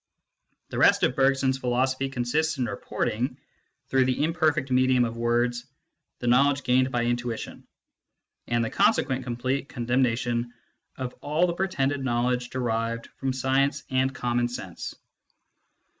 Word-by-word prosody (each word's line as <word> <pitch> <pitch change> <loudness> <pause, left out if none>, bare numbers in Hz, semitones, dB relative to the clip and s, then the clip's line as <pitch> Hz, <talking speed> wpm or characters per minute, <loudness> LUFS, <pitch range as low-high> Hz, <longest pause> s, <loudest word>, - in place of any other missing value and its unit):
The - - -4
rest - - +5
of 125 - +2
Bergson 135 0 +3
s 130 - -3
philosophy 130 +2 0
consists 135 +5 0
in 125 - 0
reporting, 120 +4 -2 0.5
through 130 -1 +3
the 130 +3 0
imperfect 155 -4 +1
medium 130 -1 +4
of 115 0 -4
words, 120 +1 0 0.5
the - - -7
knowledge 140 +3 +3
gained 130 +1 +2
by 120 -1 0
intuition, 120 -1 -3 0.8
and 120 -1 +1
the - - -4
consequent 130 -1 +2
complete 130 +3 -2
con 120 - -5
demnation 120 -1 +1 0.5
of 130 -2 -4
all 155 +4 +2
the 175 - -1
pretended 145 -7 -1
knowledge 125 0 0
derived 115 -2 -2
from 135 -1 -1
science 135 +2 +1
and 130 +1 +1
common 120 -1 0
sense. 95 -7 -7
125 Hz, 140 wpm, -26 LUFS, 120-135 Hz, 0.8 s, rest